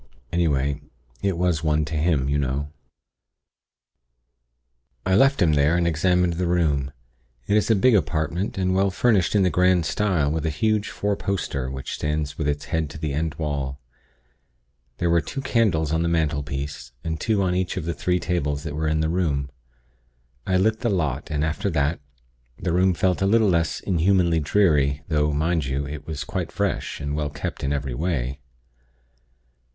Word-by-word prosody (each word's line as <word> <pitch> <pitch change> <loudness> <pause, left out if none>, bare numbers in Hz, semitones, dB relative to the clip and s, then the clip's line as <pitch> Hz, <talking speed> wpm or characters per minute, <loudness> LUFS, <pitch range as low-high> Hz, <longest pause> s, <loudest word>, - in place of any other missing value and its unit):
Anyway, 70 -4 +1 0.4
it 95 0 0
was 85 -3 +1
one 75 -1 +2
to 75 - -6
him, 75 -3 +1
you 70 +1 +1
know. 70 +2 -2 2.3
"I 95 - +1
left 135 +7 +4
him 80 -3 +3
there, 75 +3 +3
and 85 - +1
examined 90 +2 +2
the 90 +1 -1
room. 75 -6 +1 0.5
It 100 - +1
is 105 - +2
a 110 - +5
big 120 +6 +4
apartment, 85 0 0
and 95 -1 +1
well 95 +1 +3
furnished 100 -1 +2
in 100 - +4
the 90 - +2
grand 90 -2 +3
style, 85 -6 +1
with 80 0 -2
a 80 - 0
huge 105 +7 0
four 100 0 -1
poster, 80 -11 -2
which 65 0 -5
stands 75 -1 -2
with 75 - -2
its 75 0 -1
head 80 -2 -1
to 70 - -9
the 75 -2 -3
end 80 +1 -2
wall. 70 -3 -3 1.2
There 85 -1 +1
were 85 0 +4
two 135 - -6
candles 95 - +1
on 80 - +1
the 85 - +1
mantelpiece, 70 -5 -2
and 80 -1 -3
two 105 -4 +1
on 90 -1 +1
each 90 0 -1
of 85 - -3
the 85 - -1
three 90 +1 0
tables 75 -5 -1
that 75 -3 -5
were 80 +1 -1
in 80 0 +1
the 80 - +1
room. 75 -6 -1 1.0
I 95 - +2
lit 110 +4 +2
the 120 - 0
lot, 80 - -1
and 75 0 0
after 80 +5 -1
that, 75 -1 0 0.6
the 85 -1 -2
room 90 +1 +3
felt 90 +1 +1
a 95 - +3
little 110 0 +4
less 85 -4 +1
inhumanly 90 -2 +2
dreary; 75 -4 +2
though, 75 -1 +2
mind 80 +1 0
you, 70 +1 -2
it 75 0 -7
was 80 -3 -4
quite - - -4
fresh, - - -2
and 70 0 -3
well 75 -1 -1
kept 70 0 -5
in 70 - 0
every 70 -3 -2
way. 70 -3 -2
80 Hz, 180 wpm, -24 LUFS, 75-90 Hz, 2.3 s, a